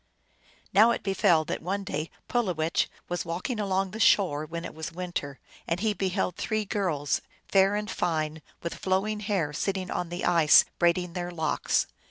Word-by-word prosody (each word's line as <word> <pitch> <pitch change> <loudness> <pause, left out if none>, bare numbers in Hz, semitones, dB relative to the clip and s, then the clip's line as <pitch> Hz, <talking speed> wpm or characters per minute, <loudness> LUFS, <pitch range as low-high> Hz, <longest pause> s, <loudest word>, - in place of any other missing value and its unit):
Now 215 +4 +7
it 235 - -1
befell 195 -5 +3
that - - -3
one 195 +4 -2
day 155 -3 -3 0.2
Pulowech 180 -10 0 0.2
was 175 0 -2
walking 180 +8 -3
along 195 -2 0
the 220 - -7
shore, 155 -8 +3
when 170 +1 -5
it - - -7
was 160 +1 -6
winter, 170 -6 -5 0.3
and 170 +1 0
he 215 +1 +1
beheld 190 -2 -1
three 215 -1 -1
girls, 170 - -1 0.3
fair 195 +1 +4
and 210 0 -2
fine, 155 -5 -1 0.2
with 170 - -3
flowing 195 +3 -1
hair, 195 -8 -1
sitting 190 +3 -2
on 175 - -2
the 175 +1 -3
ice 165 -4 +6
braiding 175 0 +2
their 175 -1 -3
locks. 160 -4 0
180 Hz, 170 wpm, -27 LUFS, 165-200 Hz, 0.3 s, Now